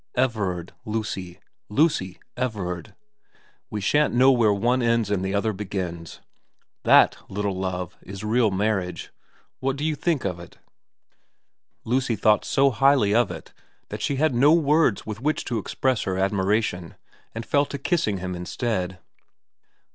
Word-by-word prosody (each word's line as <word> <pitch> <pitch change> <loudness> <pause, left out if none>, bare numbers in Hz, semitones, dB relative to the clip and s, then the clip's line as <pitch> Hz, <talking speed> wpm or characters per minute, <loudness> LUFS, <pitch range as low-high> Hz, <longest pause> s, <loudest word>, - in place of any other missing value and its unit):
Everard 100 -9 -1
Lucy. 105 -5 -4 0.3
Lucy 105 - +1 0.2
Everard. 100 -9 -4 0.7
We 105 -2 -4
shan't 145 +6 +2
know 130 +2 +6
where 115 -5 +3
one 120 +5 +1
ends 115 -3 +1
and 95 -2 0
the 95 +1 -1
other 110 +2 0
begins. 95 -4 -5 0.6
That, - - +5
little 100 0 -2
Love, 90 -1 -4
is 100 +2 -9
real 110 +1 +2
marriage. 95 -4 -2 0.5
What 135 0 -1
do 145 +2 -3
you 160 - +1
think 155 -3 -1
of 90 -3 -2
it? 85 - -13 0.7
' - - -51
Lucy 125 0 0
thought 105 +1 +3
so 135 0 +3
highly 135 -4 +3
of 120 -2 +3
it 85 -3 -9 0.4
that 105 +1 -6
she 140 - 0
had 155 +1 +2
no 135 +5 +5
words 155 - +3
with 110 +1 -6
which 150 +3 -1
to 120 -3 -1
express 130 +4 -1
her 95 -1 -1
admiration, 95 -2 0 0.4
and 115 0 -5
fell 145 0 +2
to 140 - -5
kissing 135 - 0
him 90 0 -4
instead. 90 +1 -3
105 Hz, 150 wpm, -24 LUFS, 95-130 Hz, 0.7 s, know